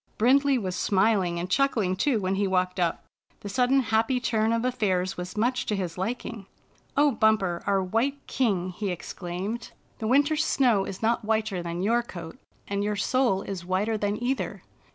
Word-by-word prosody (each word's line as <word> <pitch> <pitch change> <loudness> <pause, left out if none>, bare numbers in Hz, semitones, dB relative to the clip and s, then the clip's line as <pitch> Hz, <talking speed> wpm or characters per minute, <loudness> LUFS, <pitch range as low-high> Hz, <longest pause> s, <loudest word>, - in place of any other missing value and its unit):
Brindley 275 +4 +4
was 185 -6 -3
smiling 190 -3 +2
and 175 - -3
chuckling 215 -4 +1
too, 230 +4 +1
when 190 -1 -1
he 200 +1 +1
walked 185 0 0
up. 170 -2 0 0.4
The 205 - -6
sudden 255 +5 +3
happy 225 +2 +1
turn 225 -2 +1
of 230 +1 0
affairs 190 -7 0
was 180 +3 -7
much 250 +4 0
to 210 - 0
his 180 -4 -3
liking. 215 +1 -4 0.2
" - - -29
O 290 0 +5
Bumper, 220 -6 +2
our 195 -1 +2
white 245 +9 -1
king! 195 -8 0
" - - -5
he 205 0 -2
exclaimed. 180 +5 -5 0.2
" - - -36
The 220 - -2
winter's 290 +5 +3
snow 235 -11 +2
is 195 +3 -7
not 230 +1 +1
whiter 215 -3 0
than 170 +1 -4
your 235 +4 +3
coat, 170 -8 -9 0.3
and 200 0 -1
your 210 0 -1
soul 235 -1 +1
is 190 -3 -5
whiter 190 +5 0
than 205 0 -1
either. 260 +2 -2
210 Hz, 190 wpm, -26 LUFS, 185-240 Hz, 0.4 s, O